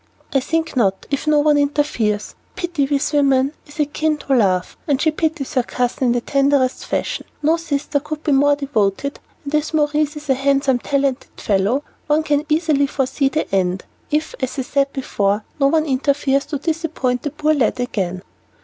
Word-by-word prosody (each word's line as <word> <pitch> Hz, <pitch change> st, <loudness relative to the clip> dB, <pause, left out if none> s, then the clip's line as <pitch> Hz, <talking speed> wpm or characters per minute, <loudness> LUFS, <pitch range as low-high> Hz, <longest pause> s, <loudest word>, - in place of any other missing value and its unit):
"I 270 Hz, -, +4 dB
think 325 Hz, +4 st, -2 dB
not, 195 Hz, -6 st, +1 dB
if 280 Hz, +2 st, -2 dB
no 305 Hz, -1 st, +4 dB
one 295 Hz, -1 st, +4 dB
interferes. 280 Hz, -8 st, 0 dB, 0.2 s
Pity, 345 Hz, -7 st, -1 dB
with 285 Hz, +1 st, 0 dB
women, 275 Hz, -1 st, +3 dB
is 295 Hz, +1 st, -14 dB
akin 300 Hz, +1 st, 0 dB
to 280 Hz, -, -2 dB
love, 185 Hz, -6 st, +1 dB
and 280 Hz, -3 st, +2 dB
she 315 Hz, +1 st, +2 dB
pities 310 Hz, -3 st, -2 dB
her 255 Hz, -, +3 dB
cousin 250 Hz, +1 st, -1 dB
in 240 Hz, -, +3 dB
the 245 Hz, -, 0 dB
tenderest 275 Hz, -1 st, +1 dB
fashion. -, -, -2 dB, 0.2 s
No 315 Hz, +3 st, +4 dB
sister 295 Hz, -3 st, -1 dB
could 305 Hz, +1 st, -6 dB
be 300 Hz, -, +1 dB
more 285 Hz, +1 st, +4 dB
devoted, 280 Hz, -2 st, -1 dB, 0.2 s
and 285 Hz, 0 st, -6 dB
as 300 Hz, +1 st, 0 dB
Maurice 300 Hz, 0 st, +1 dB
is 300 Hz, 0 st, -9 dB
a 270 Hz, -, +4 dB
handsome, 275 Hz, -1 st, +2 dB
talented 275 Hz, 0 st, -1 dB
fellow, 210 Hz, +7 st, +1 dB, 0.2 s
one 300 Hz, +1 st, +2 dB
can 295 Hz, 0 st, 0 dB
easily 305 Hz, -3 st, +2 dB
foresee 270 Hz, 0 st, 0 dB
the 310 Hz, -6 st, -3 dB
end, 185 Hz, -1 st, 0 dB, 0.2 s
if, 305 Hz, +1 st, -1 dB
as 260 Hz, 0 st, -3 dB
I 265 Hz, -, -1 dB
said 275 Hz, +1 st, 0 dB
before, 210 Hz, -6 st, -1 dB, 0.2 s
no 275 Hz, -, +4 dB
one 315 Hz, +2 st, +2 dB
interferes 275 Hz, 0 st, +1 dB
to 295 Hz, -1 st, -2 dB
disappoint 310 Hz, -5 st, -1 dB
the 290 Hz, -, -2 dB
poor 305 Hz, +1 st, +1 dB
lad 255 Hz, -3 st, +1 dB
again." 190 Hz, -7 st, -2 dB
280 Hz, 185 wpm, -20 LUFS, 255-300 Hz, 0.2 s, I